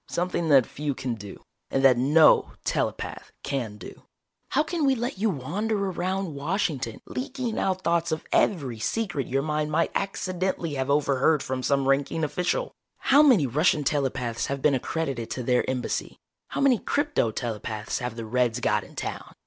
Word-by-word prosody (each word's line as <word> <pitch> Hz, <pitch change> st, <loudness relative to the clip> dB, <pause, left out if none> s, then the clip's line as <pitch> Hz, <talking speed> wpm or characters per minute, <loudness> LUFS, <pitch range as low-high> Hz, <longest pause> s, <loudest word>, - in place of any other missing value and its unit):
"Something 175 Hz, -2 st, -1 dB
that 135 Hz, -4 st, +6 dB
few 145 Hz, -1 st, -4 dB
can 125 Hz, -1 st, -3 dB
do, 105 Hz, -3 st, -10 dB, 0.3 s
and 135 Hz, -, 0 dB
that 130 Hz, -2 st, +7 dB
no 145 Hz, +6 st, +5 dB
telepath -, -, -2 dB
can 120 Hz, -7 st, -3 dB
do! 95 Hz, -, -11 dB, 0.5 s
How 300 Hz, -, +2 dB
can 325 Hz, 0 st, -2 dB
we 270 Hz, -2 st, +4 dB
let 240 Hz, -3 st, -3 dB
you 220 Hz, +2 st, +2 dB
wander 200 Hz, -, -2 dB
around 190 Hz, -2 st, -2 dB
Washington 140 Hz, -, -2 dB
leaking 255 Hz, -3 st, -3 dB
out 185 Hz, -1 st, -1 dB
thoughts 170 Hz, 0 st, +1 dB
of 155 Hz, -, -2 dB
every 135 Hz, -, +1 dB
secret 155 Hz, -, -2 dB
your 135 Hz, +2 st, 0 dB
mind 150 Hz, 0 st, -1 dB
might 165 Hz, +2 st, +1 dB
accidentally 185 Hz, -4 st, -2 dB
have 135 Hz, -1 st, -2 dB
overheard 140 Hz, +1 st, +2 dB
from 130 Hz, 0 st, -3 dB
some 140 Hz, 0 st, +1 dB
ranking 140 Hz, +4 st, +1 dB
official? 180 Hz, -, -1 dB, 0.3 s
How 280 Hz, +2 st, +5 dB
many 250 Hz, -, +5 dB
Russian 150 Hz, +4 st, +2 dB
telepaths 130 Hz, -5 st, -1 dB
have 140 Hz, 0 st, -2 dB
been 150 Hz, -, +4 dB
accredited 135 Hz, -3 st, -2 dB
to 125 Hz, -, -4 dB
their 125 Hz, +1 st, +1 dB
Embassy? 130 Hz, -1 st, -3 dB, 0.3 s
How -, -, -3 dB
many 265 Hz, -5 st, +4 dB
crypto 290 Hz, -, 0 dB
telepaths 110 Hz, -1 st, -4 dB
have 125 Hz, -3 st, -4 dB
the 115 Hz, -1 st, -5 dB
Reds 120 Hz, +1 st, +1 dB
got -, -, +1 dB
in -, -, -15 dB
town? -, -, -6 dB
150 Hz, 170 wpm, -26 LUFS, 130-190 Hz, 0.5 s, that